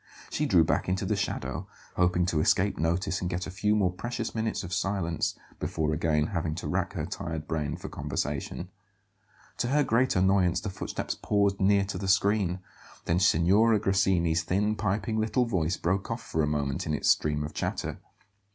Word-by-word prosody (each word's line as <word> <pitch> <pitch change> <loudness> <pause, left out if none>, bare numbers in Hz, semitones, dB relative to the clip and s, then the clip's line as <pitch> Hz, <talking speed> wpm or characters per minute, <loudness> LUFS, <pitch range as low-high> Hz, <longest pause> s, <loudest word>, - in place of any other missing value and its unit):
She 150 - 0
drew 90 -8 +5
back 80 - 0
into 95 +1 0
the - - +1
shadow, - - -3 0.3
hoping 90 0 +2
to 85 -3 0
escape 95 +6 +2
notice 90 +4 0
and 90 - -1
get 90 0 -2
a - - -6
few 105 +2 +1
more 95 -4 +2
precious 120 +3 -4
minutes 110 -1 -2
of 90 0 -6
silence 95 -5 -1 0.2
before 75 -1 -1
again 75 -1 +1
having 80 -3 -1
to - - -5
rack - - -1
her - - -3
tired 80 -2 -5
brain 75 -3 -2
for - - -8
conversation. 75 0 -3 0.9
To - - 0
her 145 +3 +3
great 125 +1 +2
annoyance 95 -2 +3
the 105 - -5
footsteps 95 - -4
paused 100 -1 +1
near 100 0 +4
to 95 - -4
the 95 - -3
screen; 95 -1 +2 0.4
then 85 +2 +2
Signora 100 +6 +4
Grassini's 95 -5 +2
thin, 100 +6 0
piping 110 +2 -1
little 115 +3 +1
voice 90 -6 0
broke 95 +3 -1
off 115 0 -3
for 80 - -1
a 75 - +1
moment 70 -2 -1
in 75 - 0
its 70 - +3
stream 75 -1 +1
of 75 - -6
chatter. - - -3
95 Hz, 185 wpm, -28 LUFS, 80-105 Hz, 0.9 s, drew